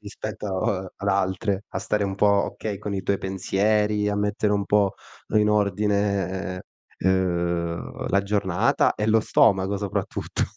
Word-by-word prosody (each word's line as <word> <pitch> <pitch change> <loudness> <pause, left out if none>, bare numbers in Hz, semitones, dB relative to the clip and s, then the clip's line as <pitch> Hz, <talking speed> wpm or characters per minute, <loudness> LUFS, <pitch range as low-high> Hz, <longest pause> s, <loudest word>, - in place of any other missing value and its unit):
rispetto 100 -2 -3
ad 100 - -4
altre, 95 +1 0
a - - -3
stare 105 -1 0
un 95 -1 -2
po', 105 - +3 0.3
okay, 105 -2 -4
con 105 -1 -5
i 95 - -1
tuoi 100 - +1
pensieri, 105 +2 +1
a 105 - -1
mettere 105 0 0
un 100 -1 0
po' 100 -2 +3 0.4
in 105 0 +4
ordine, 100 -3 0 0.4
uhm, 85 -2 -1
la 100 - +3
giornata 100 0 +1
e 105 - -2
lo 110 0 +4
stomaco 100 -2 +3
soprattutto. 100 -1 -3
100 Hz, 140 wpm, -24 LUFS, 95-105 Hz, 0.4 s, in